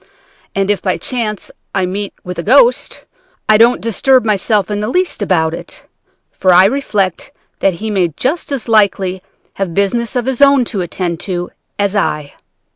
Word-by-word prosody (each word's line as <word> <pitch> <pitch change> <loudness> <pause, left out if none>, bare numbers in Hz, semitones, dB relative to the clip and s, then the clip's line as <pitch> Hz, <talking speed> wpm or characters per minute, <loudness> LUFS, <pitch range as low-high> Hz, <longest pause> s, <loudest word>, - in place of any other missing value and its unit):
And 195 +1 +1
if 205 - -1
by 185 -2 -1
chance 220 -5 -3 0.2
I 190 - +1
meet 200 +2 -4
with 180 -1 -6
a - - 0
ghost, 245 +4 +3 0.4
I 215 - +5
don't 235 +2 +5
disturb 245 +3 +2
myself 210 -1 +1
in 205 0 -2
the 210 - -2
least 360 +1 -1
about 165 -5 +1
it, 170 - -8 0.5
for 185 - +1
I 180 +2 +7
reflect 205 -6 -1 0.3
that 190 -3 +1
he 215 +4 -4
may 190 -4 +2
just 260 - -3
as 270 -4 -3
likely 195 -4 +2 0.3
have 190 -4 -4
business 220 +4 0
of 245 -2 0
his 265 0 -2
own 275 -3 +5
to 195 - -1
attend 175 -1 -3
to 175 -2 -4 0.3
as 205 0 0
I. 150 -7 -1
205 Hz, 175 wpm, -15 LUFS, 185-235 Hz, 0.5 s, I